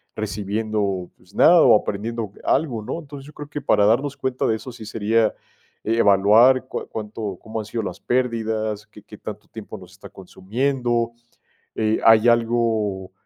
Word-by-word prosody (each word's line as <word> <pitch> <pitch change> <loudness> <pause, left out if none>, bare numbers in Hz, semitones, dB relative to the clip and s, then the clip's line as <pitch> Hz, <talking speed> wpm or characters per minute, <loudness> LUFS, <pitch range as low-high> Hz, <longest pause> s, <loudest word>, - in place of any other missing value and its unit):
recibiendo, 105 -2 -2
pues, 95 - -23
nada 170 0 +6
o 120 - +7
aprendiendo 110 +1 -4
algo, 135 -7 0
¿no?, 165 - -4
entonces, 140 -3 -11
yo 150 - -13
creo 145 0 -9
que 150 0 -5
para 100 - +3
darnos 135 +6 +1
cuenta 130 -1 -1
de 110 - +2
eso 125 +3 -8
sí 110 - -11
sería 110 +1 +1 0.5
evaluar 115 +4 +4
cua - - -5
cuánto 105 -3 -5
cómo 110 0 -5
han 105 - -5
sido 115 0 -3
las 90 - -6
pérdidas, 110 -4 -1
qué 105 -1 -16
qué 105 - -13
tanto 105 - -8
tiempo 110 -1 -9
nos 90 -2 -14
está 95 - -13
consumiendo, 120 +5 -2 0.7
eh, 110 0 +1
hay 115 0 +6
algo, 115 -5 +1
110 Hz, 165 wpm, -22 LUFS, 105-120 Hz, 0.7 s, o